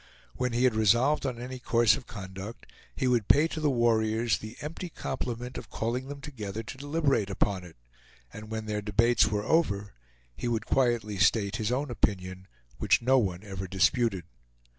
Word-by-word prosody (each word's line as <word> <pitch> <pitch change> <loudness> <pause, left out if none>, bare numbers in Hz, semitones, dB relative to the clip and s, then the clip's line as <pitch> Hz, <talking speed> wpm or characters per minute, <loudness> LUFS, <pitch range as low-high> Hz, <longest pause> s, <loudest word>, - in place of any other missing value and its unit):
When 125 -1 -1
he 120 +2 +1
had 130 -2 +4
resolved 120 +7 +3
on 120 -3 -4
any 130 +1 -6
course 120 -2 +4
of 130 - -9
conduct, 95 0 -8 0.3
he 130 - 0
would 120 -5 +2
pay 150 +3 +5
to 160 - -4
the 155 -1 +2
warriors 115 -2 +2
the 110 +2 -9
empty 165 +4 -5
compliment 125 -4 -4
of - - -12
calling 120 +4 -2
them 140 0 -7
together 110 -7 -6
to 120 - -8
deliberate 145 -7 +1
upon 100 -1 0
it, 85 -2 -12 0.6
and 110 0 -9
when 110 0 -4
their 105 -1 -2
debates 110 +3 +3
were 105 -1 -1
over, 100 -12 +1 0.4
he - - -4
would 115 -2 -1
quietly 120 -6 +1
state 105 -1 +3
his 110 +1 -1
own 135 +1 -1
opinion, 95 -4 -2 0.3
which - - +3
no 130 +2 +5
one 95 -4 -2
ever 95 -2 -6
disputed. 95 +1 +2
115 Hz, 180 wpm, -28 LUFS, 105-125 Hz, 0.6 s, pay